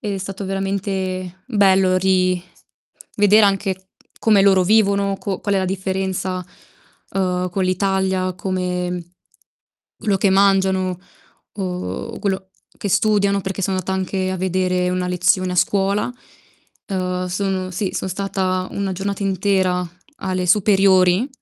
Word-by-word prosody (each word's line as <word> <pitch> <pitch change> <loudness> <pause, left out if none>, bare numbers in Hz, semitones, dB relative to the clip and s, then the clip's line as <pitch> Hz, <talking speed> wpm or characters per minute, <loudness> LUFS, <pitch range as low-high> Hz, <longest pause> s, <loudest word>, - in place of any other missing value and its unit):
Ed 210 -3 -3
è - - -3
stato 195 +1 -6
veramente 190 -1 -3
bello 190 -5 +3
ri 185 -1 +2 0.8
vedere 205 +1 +5
anche 195 -1 -1 0.3
come 210 -3 +4
loro 190 -2 +5
vivono, 200 -1 +2
co 195 -2 -4
qual 205 -1 -1
è - - +3
la 190 - 0
differenza, 190 -1 -2 0.7
uhm, 180 -1 -1
con 190 +1 -1
l'Italia, 190 0 0
come 180 -2 -3 0.8
quello 205 -3 0
che 195 0 +2
mangiano 190 -2 +2 0.6
o 185 +4 -4
quello 190 -2 -2 0.3
che 200 - -3
studiano, 200 0 +2
perché 195 +1 -4
son 190 +1 0
andata 185 0 -2
anche 190 0 -1
a 185 - -3
vedere 185 0 0
una 180 0 -1
lezione 180 +1 +2
a - - -3
scuola. 200 +4 +1 0.8
Uhm, 180 -2 -2
sono 185 0 -2
sì, 185 +2 -2
son 190 - -3
stata 185 -1 -1
una 200 -1 -2
giornata 200 +2 -3
intera 185 -2 +1 0.3
alle 185 -1 -2
superiori 190 +1 +4
190 Hz, 130 wpm, -20 LUFS, 185-195 Hz, 0.8 s, vedere